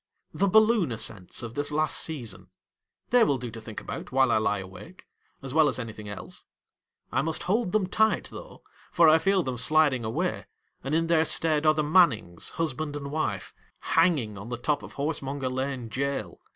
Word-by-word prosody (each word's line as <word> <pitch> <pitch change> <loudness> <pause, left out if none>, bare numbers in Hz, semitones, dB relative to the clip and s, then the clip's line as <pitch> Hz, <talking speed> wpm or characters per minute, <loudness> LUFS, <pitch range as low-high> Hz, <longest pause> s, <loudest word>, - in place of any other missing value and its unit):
The 200 - +1
balloon 215 - +4
ascents 110 -3 -3
of 115 -1 -6
this 145 +3 0
last 155 +1 +1
season. 115 - -3 0.6
They 245 -1 +6
will 140 -10 +2
do 120 -2 -6
to 115 0 -9
think 110 -1 -7
about, - - -7
while 130 0 +3
I - - +3
lie 105 -1 0
awake, 95 - -11 0.4
as 135 -1 -6
well 155 -1 +5
as - - -1
anything 110 -4 -7
else. 100 - -9 0.7
I - - +1
must 160 +2 -2
hold 205 +1 0
them 215 -1 +2
tight 220 +4 +1
though, - - -11 0.3
for 170 -1 +5
I 160 +1 +6
feel 195 +2 +2
them 130 -4 -3
sliding 145 -2 +3
away, 110 +1 -2 0.4
and 135 +4 -1
in 165 +1 +2
their 165 -1 +3
stead 155 -2 +2
are 155 - +5
the 155 - +1
Mannings, 145 - +2
husband 155 -2 -2
and 140 -1 -6
wife, 110 -11 -3 0.3
hanging 145 - +1
on 105 +4 -9
the 120 - -3
top 145 +5 -1
of - - -11
Horsemonger 140 -2 -3
Lane 130 -2 -3
Jail. 140 +3 -3
145 Hz, 190 wpm, -27 LUFS, 115-165 Hz, 0.7 s, They